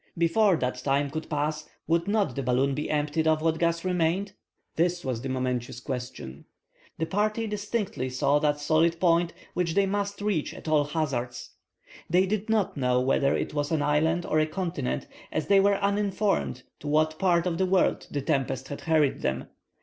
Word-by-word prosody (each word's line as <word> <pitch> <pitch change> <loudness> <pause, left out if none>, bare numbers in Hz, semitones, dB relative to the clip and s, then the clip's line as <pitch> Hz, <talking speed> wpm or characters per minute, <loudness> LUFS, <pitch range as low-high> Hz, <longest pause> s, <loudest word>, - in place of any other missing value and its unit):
Before 180 +4 +4
that 125 -5 -2
time 140 0 +1
could 160 +1 -5
pass, 150 0 -2 0.2
would 170 +2 +1
not 205 - +1
the 140 - -2
balloon 130 +2 +1
be 150 +2 -3
emptied 150 +1 0
of 155 0 +2
what 160 0 +1
gas 170 +1 0
remained? 180 +2 0 0.4
This 175 +1 0
was 125 -3 -2
the 135 - -4
momentous 125 -2 -2
question. 125 - -6 0.5
The 160 - -1
party 215 +5 0
distinctly 210 - -2
saw 140 +3 +2
that 145 -1 +1
solid 160 +3 +2
point 170 -1 +3 0.2
which 170 -2 -1
they 200 0 +4
must 200 +1 -2
reach 205 -7 -1
at - - -11
all 150 -2 +3
hazards. 135 -6 -3 0.6
They 180 +3 +4
did 215 +2 -2
not 215 -4 +1
know 125 -3 +2
whether 135 +2 +2
it - - -3
was 145 0 -1
an 155 -3 +1
island 160 +4 +1
or 155 - +1
a 155 - +2
continent, 155 - -3 0.3
as 155 - -1
they 200 -1 +5
were 200 +1 +4
uninformed 200 - 0
as - - -19 0.2
to 150 - -8
what 155 +1 +1
part 175 -3 +3
of 170 -2 -1
the 190 - +2
world 190 0 +2
the 145 - -2
tempest 135 -3 -1
had 140 - -6
hurried 155 -4 +2
them. 65 0 -2
160 Hz, 190 wpm, -27 LUFS, 140-185 Hz, 0.6 s, they